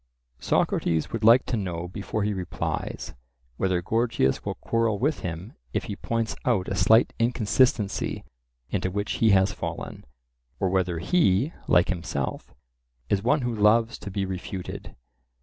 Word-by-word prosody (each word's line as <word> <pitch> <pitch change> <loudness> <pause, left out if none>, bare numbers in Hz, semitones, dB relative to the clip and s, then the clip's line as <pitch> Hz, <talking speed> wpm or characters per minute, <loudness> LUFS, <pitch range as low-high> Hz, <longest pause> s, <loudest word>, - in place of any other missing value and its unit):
Socrates 80 -2 0
would 115 -1 -3
like 115 +4 +7
to - - -1
know 90 -5 -3
before 100 +3 -3
he 105 0 0
replies, 90 -3 -4 0.4
whether 90 -2 0
Gorgias 115 - +1
will - - -3
quarrel 115 -2 0
with 145 +8 0
him 90 +5 -6 0.2
if - - 0
he 100 - -5
points 115 +1 -2
out 110 -7 +1
a 100 - -2
slight 110 +6 +4
inconsistency 115 -2 +1 0.5
into 95 -2 0
which 100 +2 -2
he 115 - +5
has 95 0 +4
fallen, - - -6 0.6
or 95 - +1
whether 90 -2 0
he, 125 - +2
like 90 - +4
himself, 85 -7 -3 0.6
is 100 - +2
one 135 +7 +2
who 120 -1 -1
loves 110 +2 +3
to - - -7
be 100 0 -2
refuted. 95 0 -6
100 Hz, 150 wpm, -26 LUFS, 90-115 Hz, 0.6 s, like